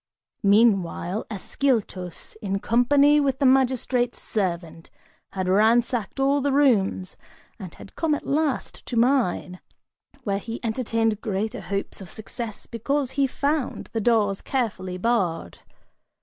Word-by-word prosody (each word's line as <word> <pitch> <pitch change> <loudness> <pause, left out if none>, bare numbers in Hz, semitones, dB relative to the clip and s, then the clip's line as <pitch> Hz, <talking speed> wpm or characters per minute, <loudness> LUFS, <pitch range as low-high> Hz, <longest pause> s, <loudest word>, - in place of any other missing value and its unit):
Meanwhile 200 -2 +2
Ascyltos, 205 -5 -2
in 195 -2 -1
company 280 +7 +4
with 275 -2 +1
the 275 - +1
magistrate's 255 -2 +2
servant, 170 -5 -3 0.4
had 185 -1 -2
ransacked 225 +4 +2
all 275 +1 +3
the 285 +1 +1
rooms 220 -10 +2 0.4
and 185 -5 -9
had - - -13
come 315 -2 +1
at - - -7
last 295 -2 -1
to 240 - -3
mine, 230 -7 +1 0.6
where 200 -2 -1
he 230 +3 -6
entertained 225 -2 0
greater 215 +1 -2
hopes 200 0 -4
of 185 - -9
success, 220 0 -6
because 265 +3 -2
he 275 0 +1
found 285 +1 -2
the 225 - -1
doors 210 -3 +2
carefully 195 -8 -2
barred. 185 - -1
225 Hz, 125 wpm, -24 LUFS, 195-265 Hz, 0.6 s, company